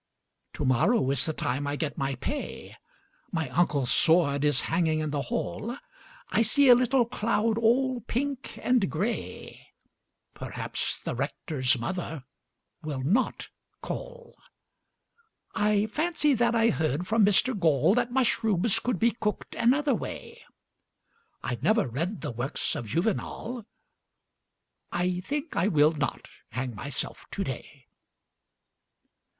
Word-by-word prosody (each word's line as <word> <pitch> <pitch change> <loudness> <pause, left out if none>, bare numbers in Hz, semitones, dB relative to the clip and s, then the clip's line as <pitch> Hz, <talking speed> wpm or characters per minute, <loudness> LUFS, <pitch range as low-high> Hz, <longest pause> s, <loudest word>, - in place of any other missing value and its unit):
Tomorrow 135 - +2
is 135 -1 +2
the 160 - -2
time 140 +1 -2
I 145 - -1
get 145 -1 -3
my 135 0 -2
pay 280 - -5 0.6
My 160 -7 -2
uncle's 140 -3 +1
sword 150 -3 +4
is 145 -2 +2
hanging 165 -1 +1
in 155 -1 -2
the 145 -1 -1
hall 235 - -3 0.5
I - - +3
see 260 +5 +4
a - - +11
little 250 +1 +3
cloud 225 -1 0
all 250 +2 +2
pink 270 +2 -3
and 245 -6 +2
grey 200 +9 -4 0.7
Perhaps - - -3
the - - -5
Rector's 130 -7 0
mother 160 +2 -4 0.6
will 145 -5 -4
not 210 - 0 0.3
call - - -7 1.2
I 210 0 +2
fancy 300 +4 +1
that 235 -1 +2
I 230 0 +4
heard 160 +1 -1
from 220 0 +3
Mr 205 +6 +4
Gall 165 - +3
That 245 +1 +1
mushrooms 225 -5 +2
could 245 -5 -1
be 235 +5 +3
cooked 215 -3 -3
another 275 +4 +2
way 220 - -6 1.0
I 120 -1 -3
never 215 +2 +3
read 165 - -3
the - - -3
works 120 +8 -2
of 130 -7 -5
Juvenal 220 - -2 1.2
I 180 0 0
think 290 - -4
I 170 +4 +2
will 155 -5 +4
not 145 -5 -3 0.2
hang 130 -1 -3
myself 135 +6 -5
today. - - -6
195 Hz, 125 wpm, -27 LUFS, 145-235 Hz, 1.2 s, a